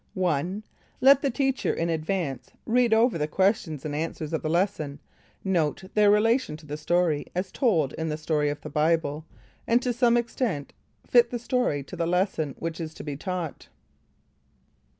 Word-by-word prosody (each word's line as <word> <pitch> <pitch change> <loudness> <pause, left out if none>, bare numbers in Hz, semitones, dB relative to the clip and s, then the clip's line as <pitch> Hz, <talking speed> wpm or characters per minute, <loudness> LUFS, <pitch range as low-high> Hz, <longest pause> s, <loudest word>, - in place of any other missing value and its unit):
1. 185 +2 -1 0.4
Let 275 +1 +6
the 280 - +1
teacher 270 +1 0
in 165 - -1
advance 160 -4 -2 0.2
read 240 0 +3
over 225 -4 +3
the 150 - 0
questions 175 -4 0
and 150 - -3
answers 155 0 -4
of 160 - 0
the 155 - -2
lesson, 165 -5 0 0.5
note 175 -3 0
their 210 -1 +5
relation 215 - +2
to 155 - -16
the 150 0 -5
story 160 -1 +1
as 185 +1 -2
told 170 - +1
in 160 0 -3
"The 150 - -2
Story 150 -1 0
of 145 - -4
the 150 - -7
Bible," 155 0 +1 0.4
and 235 +1 +4
to 250 - 0
some 240 0 +3
extent 230 - -2 0.3
fit 240 -1 +5
the 245 - -3
story 240 - 0
to 160 - -9
the 165 -1 -1
lesson 175 -5 0
which 165 0 -4
is 160 -1 -6
to - - -8
be 145 -2 -4
taught. 175 0 -5
170 Hz, 175 wpm, -26 LUFS, 155-225 Hz, 0.5 s, Let